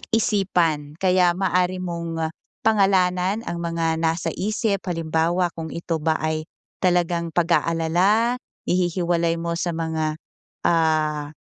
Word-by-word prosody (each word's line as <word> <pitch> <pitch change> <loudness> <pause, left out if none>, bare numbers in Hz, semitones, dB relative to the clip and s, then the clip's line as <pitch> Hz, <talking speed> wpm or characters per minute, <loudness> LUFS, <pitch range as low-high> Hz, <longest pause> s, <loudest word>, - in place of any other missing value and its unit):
isipan. 175 -9 +1
Kaya 180 -2 +4
maaari 185 -1 +1
mong 165 -2 -3 0.3
pangalanan 195 -1 +3
ang 170 - -3
mga 165 -1 -1
nasa 165 0 0
isip, 210 -1 -1
halimbawa 165 +1 0
kung 160 -1 -4
ito 170 -1 -2
ba 160 0 +2
ay 155 0 -1 0.4
talagang 175 -2 +1
pag-aalala, 175 +7 +2 0.3
i-hi-hiwalay 175 -2 +1
mo 170 0 -2
sa 175 - -1
mga, 160 -1 -1 0.5
ah, 155 -3 +1
170 Hz, 110 wpm, -23 LUFS, 165-185 Hz, 0.5 s, Kaya